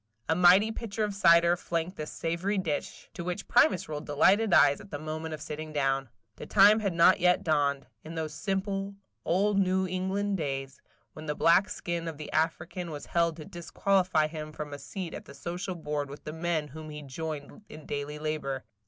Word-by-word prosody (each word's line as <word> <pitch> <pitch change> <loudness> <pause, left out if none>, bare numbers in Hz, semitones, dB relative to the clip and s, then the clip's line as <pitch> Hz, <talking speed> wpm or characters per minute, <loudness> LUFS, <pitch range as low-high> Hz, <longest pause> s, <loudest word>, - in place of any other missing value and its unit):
A - - +3
mighty 180 +5 +6
pitcher 220 -1 -3
of 210 -1 -1
cider 170 -3 +5
flanked 170 +1 -3
this 155 0 -6
savory 170 +5 -2
dish, 160 -6 -3
to 170 - -6
which 180 +3 -4
Primus 190 -1 +4
rolled 150 0 -6
delighted 195 +9 +3
eyes 145 -1 +5
at 205 - -14
the 145 - -4
moment 155 +1 -5
of 155 - -9
sitting 155 0 -6
down. 135 -3 0 0.3
The - - -8
time 210 +2 +6
had 200 -4 -1
not 170 +2 +6
yet 180 0 +3
dawned, 140 -3 +1 0.2
in 160 +2 -8
those 160 -2 -3
simple, 195 +3 -2 0.3
old 200 +3 +2
New 190 0 +2
England 190 +2 -1
days, 135 -4 -4 0.3
when 155 0 -9
the 150 - -1
black 180 +7 +4
skin 170 -2 -4
of 160 -3 -5
the 150 - -8
African 165 +2 -1
was 150 -2 -7
held 170 -1 +1
to 155 - -8
disqualify 180 -1 +1
him 155 0 -6
from 150 -1 -7
a 145 - -6
seat 185 0 -6
at - - -8
the - - -12
social 180 +5 -4
board 150 -3 -3
with 140 - -10
the 150 - -6
men 160 -2 -1
whom 155 +2 -9
he 150 0 -8
joined 150 +5 -6
in 155 -1 -11
daily 145 +1 -4
labor. 150 -3 -3
165 Hz, 195 wpm, -29 LUFS, 150-185 Hz, 0.3 s, mighty